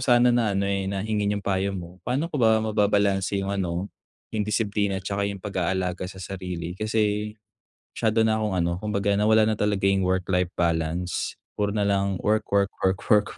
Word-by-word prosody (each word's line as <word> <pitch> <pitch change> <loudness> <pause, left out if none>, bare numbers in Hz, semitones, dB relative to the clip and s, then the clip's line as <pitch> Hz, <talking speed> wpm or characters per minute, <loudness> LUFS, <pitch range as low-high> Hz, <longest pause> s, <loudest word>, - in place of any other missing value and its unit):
sana 120 -1 +4
na 115 -4 +2
ano, 100 - +1
eh, 100 -1 -1
na 100 0 -2
hingin 105 -1 0
yung 100 - -6
payo 100 0 0
mo. 90 +1 -9
Pa'no 140 +7 0
ko - - -1
ba 110 -1 +5
mababalanse 100 -2 +1
yung 100 0 -1
ano, 95 0 -2 0.4
yung 105 -1 0
disiplina 105 -2 0
at 95 - -6
tsaka 100 +1 -1
yung 100 -1 -6
pag-aalaga 95 -1 -1
sa 95 - -11
sarili? 90 -3 -5
Kasi 105 +1 0 0.6
masyado 110 0 +1
na 110 - +2
akong 105 -3 -1
ano, 85 0 +1
kumbaga 100 -1 +1
nawala 110 +1 +4
na 110 - +1
talaga 100 -2 +1
yung 95 -1 +2
work-life 90 -1 0
balance. 85 +1 -1 0.2
Puro 105 0 0
na 100 -1 0
lang 100 -2 +1
work, 110 +1 +1
work, 100 0 +2
work, 95 0 +2
work, 105 -2 +4
100 Hz, 190 wpm, -25 LUFS, 95-105 Hz, 0.6 s, ba